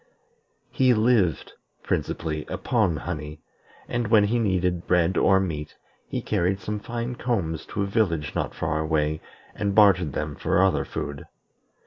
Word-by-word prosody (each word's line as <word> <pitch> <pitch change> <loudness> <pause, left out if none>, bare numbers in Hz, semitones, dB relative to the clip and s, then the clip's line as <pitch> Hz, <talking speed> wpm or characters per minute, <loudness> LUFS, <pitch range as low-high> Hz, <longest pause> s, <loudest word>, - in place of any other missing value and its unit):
He 130 -2 +3
lived 110 - +2 0.3
principally 75 -2 -2
upon 95 -10 0
honey; 75 -2 -6 0.5
and 120 -2 -1
when 110 -1 +5
he 115 +4 +1
needed 90 -5 0
bread 90 0 +2
or 95 +2 +4
meat, 80 -6 -4 0.3
he - - -4
carried 95 +3 0
some 105 +2 -4
fine 120 +3 -4
combs 95 -11 -2
to 100 - -2
a - - 0
village 95 -8 0
not - - -2
far 80 - -1
away 75 -1 0 0.3
and 100 -1 -2
bartered 95 -8 +5
them 75 +1 -3
for - - 0
other 95 - +2
food. 70 0 -5
95 Hz, 145 wpm, -25 LUFS, 80-105 Hz, 0.5 s, when